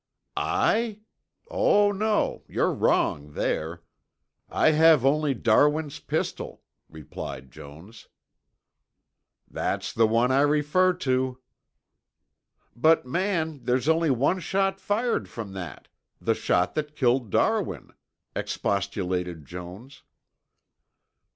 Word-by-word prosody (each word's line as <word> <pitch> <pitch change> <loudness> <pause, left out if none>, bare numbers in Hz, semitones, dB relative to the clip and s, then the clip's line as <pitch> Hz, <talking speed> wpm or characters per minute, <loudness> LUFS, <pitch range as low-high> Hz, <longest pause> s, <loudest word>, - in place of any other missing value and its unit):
"I? 220 -2 0 0.5
Oh, 205 - +3
no, 210 +2 0
you're - - 0
wrong 75 0 0
there. 85 +3 -2 0.7
I 155 - +3
have 155 -3 +5
only 145 0 +2
Darwin's 145 +6 +2
pistol," - - -4 0.3
replied 70 -3 -8
Jones. 85 +10 -13 1.4
"That's - - -3
the 115 0 +4
one 115 +3 +2
I 135 +1 +4
refer 150 +5 +3
to." 130 -6 -1 1.4
"But, 155 +3 +3
man, 160 -1 -2
there's 125 +3 +1
only 160 0 +3
one 140 +8 +2
shot 195 +1 0
fired 230 +5 -1
from 105 -4 -7
that, 90 -6 -8 0.3
the - - +1
shot 90 0 0
that 150 0 -4
killed 125 -4 +1
Darwin," - - 0 0.4
expostulated 90 -5 -2
Jones. 90 - -10
130 Hz, 100 wpm, -26 LUFS, 100-160 Hz, 1.4 s, have